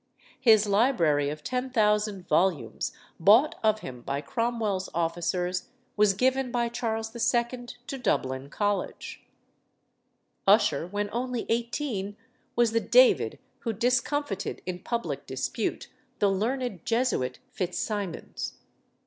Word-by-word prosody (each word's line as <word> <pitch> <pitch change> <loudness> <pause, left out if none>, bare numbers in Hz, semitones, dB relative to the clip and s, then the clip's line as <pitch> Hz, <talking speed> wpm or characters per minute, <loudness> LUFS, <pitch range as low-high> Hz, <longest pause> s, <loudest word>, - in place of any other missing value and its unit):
His 220 -4 +6
library 195 - +3
of 150 0 -6
10,000 210 -6 0
volumes, 180 -6 +1 0.3
bought 215 - +6
of 215 0 +3
him 125 -2 -8
by 140 +3 -2
Cromwell's 225 - -1
officers, 175 +2 -1 0.3
was 205 -2 +4
given 260 +3 +1
by 240 -1 0
Charles 225 -2 -3
II. 240 +1 0 0.2
to 270 - -5
Dublin 135 - -1
College. 205 +4 -2 1.3
Ussher, 195 -6 +4
when 205 +2 -2
only 245 0 -2
eighteen, 230 -3 -2 0.4
was 235 -2 +3
the 230 - +2
David - - +4 0.2
who 230 - -2
discomfited 240 -1 -1
in 180 0 -4
public 235 +5 -3
dispute - - -2 0.3
the 205 - +3
learned 230 - -1
Jesuit 230 - 0
Fitz 180 -2 -3
Simons. 205 -5 -3
215 Hz, 115 wpm, -27 LUFS, 185-240 Hz, 1.3 s, His